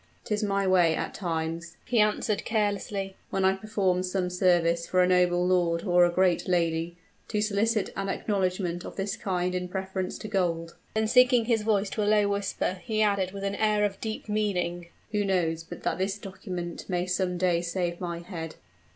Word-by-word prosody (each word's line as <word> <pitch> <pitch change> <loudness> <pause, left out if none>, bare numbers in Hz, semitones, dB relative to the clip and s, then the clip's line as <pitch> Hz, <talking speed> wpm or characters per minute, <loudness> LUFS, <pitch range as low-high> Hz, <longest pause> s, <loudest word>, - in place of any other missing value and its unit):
"'Tis 210 0 -1
my 200 -1 +1
way 175 -4 +4
at - - -3
times," 165 -1 -3
he 240 -1 +1
answered, 210 0 +1
carelessly, 205 -3 -1
"when 190 0 0
I 190 - +5
perform 195 -3 0
some 185 0 -1
service 170 -2 +2
for 185 0 +3
a - - +3
noble 180 -1 +3
lord 175 -2 +2
or 180 -2 +5
a 175 - +1
great 180 0 +2
lady, 170 -1 0 0.3
to 210 - -1
solicit 215 +1 +1
an 195 0 -2
acknowledgment 185 -3 -1
of - - -8
this 195 +1 -2
kind 180 -2 -1
in 180 0 -2
preference 190 0 -3
to - - -7
gold." 170 -5 -1 0.2
Then, 220 0 +2
sinking 250 0 +5
his 225 -2 +2
voice 210 -2 +1
to 215 - -2
a 205 - +2
low 210 -1 +4
whisper, 195 -2 -2
he 215 -3 +1
added 200 -3 +1
with 200 0 -7
an 200 0 -1
air 210 0 +2
of 195 -1 -4
deep 220 0 -4
meaning, 180 -5 -1 0.2
"Who 210 -1 +1
knows 170 -4 0
but 165 - -10
that - - -1
this 195 +2 -1
document 185 -3 -6
may 180 -1 0
some 180 0 -1
day 175 -1 +2
save 175 0 -2
my 170 -1 -4
head?" 165 -3 -7
185 Hz, 190 wpm, -27 LUFS, 175-205 Hz, 0.3 s, I